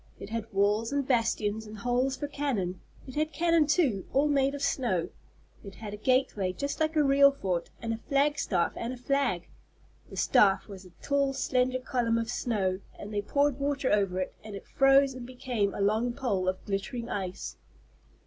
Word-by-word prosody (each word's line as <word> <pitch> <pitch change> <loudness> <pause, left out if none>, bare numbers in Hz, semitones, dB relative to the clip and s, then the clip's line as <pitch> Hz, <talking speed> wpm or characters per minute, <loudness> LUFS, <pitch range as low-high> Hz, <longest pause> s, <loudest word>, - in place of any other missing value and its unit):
It 205 - -9
had 230 -1 -4
walls 205 +4 +1
and 280 -2 -1
bastions 220 -3 0
and 215 0 -9
holes 245 +4 0
for 290 - -3
cannon. 235 -12 -2 0.2
It 260 - -9
had 310 +2 0
cannon 335 -2 +3
too, 290 - +1
all 285 +2 +3
made 275 -1 +2
of 285 - -5
snow. 235 -11 0 0.5
It 195 -2 -10
had 210 -2 -7
a - - -5
gateway, 215 -5 +1
just 280 +9 -4
like 315 0 0
a 305 - +4
real 280 0 +6
fort, 185 -10 -2
and 230 -1 -2
a - - -3
flag 290 +2 +2
staff 175 -4 0
and 235 +2 -4
a - - -8
flag. 250 -8 0 0.6
The - - -10
staff 195 -2 +4
was 195 -2 -10
a - - -13
tall 280 -1 +1
slender 255 -1 +1
column 245 -3 0
of 230 0 -2
snow, 195 -7 -1 0.2
and 210 +1 -8
they 205 - 0
poured 280 +5 +1
water 280 -1 0
over 195 -3 +1
it, 185 - -3
and 215 -1 -8
it 195 - -9
froze 270 0 +4
and 255 -1 -8
became 245 -5 -1
a - - -3
long 220 +4 +1
pole 205 -8 -1
of 185 0 -2
glittering 220 +5 -3
ice. 190 -4 -4
240 Hz, 195 wpm, -29 LUFS, 205-275 Hz, 0.6 s, real